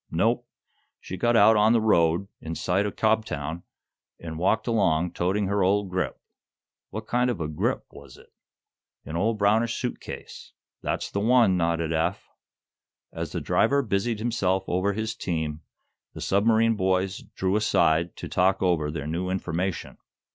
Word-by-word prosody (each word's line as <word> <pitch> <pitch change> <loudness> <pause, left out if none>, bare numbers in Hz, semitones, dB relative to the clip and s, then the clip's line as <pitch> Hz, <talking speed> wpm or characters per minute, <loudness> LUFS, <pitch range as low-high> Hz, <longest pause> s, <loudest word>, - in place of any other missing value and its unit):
"Nope; - - +1 0.5
she 95 - -7
got 120 +6 +1
out 110 0 +7
on 105 +2 +4
the 115 - +4
road, 85 -4 +2
in 80 +1 -6
sight 90 +6 0
o' - - -3
Cobtown, 90 -9 -1 0.6
an' 80 -1 -7
walked 95 +5 +1
along, 90 -7 +1
toting 95 +4 0
her 100 +1 0
old 100 +1 +1
grip." 90 0 -2 0.7
"What 110 +1 -6
kind 125 +2 +1
of 115 -7 -2
a 80 - -2
'grip' 75 0 -1
was - - -13
it?" - - -20 0.7
"An 80 - -6
old 110 +6 +1
brownish 110 +3 +2
suit 125 -2 -3
case." - - -10 0.3
"That's - - -3
the 100 - -1
one," 115 -2 +4
nodded 85 -2 0
Eph. 85 +4 -2 0.8
As - - -5
the - - -3
driver 140 0 +2
busied 110 +1 -1
himself 100 -5 0
over 95 +3 0
his 110 +2 -3
team, 80 -6 -3 0.5
the - - -9
submarine 110 +3 +3
boys 95 -1 0
drew 95 +1 -2
aside 85 -5 +2
to - - -7
talk 95 +1 +1
over 85 -5 +1
their 75 -2 -5
new 85 +4 -2
information. 95 0 -3
95 Hz, 160 wpm, -26 LUFS, 85-110 Hz, 0.8 s, out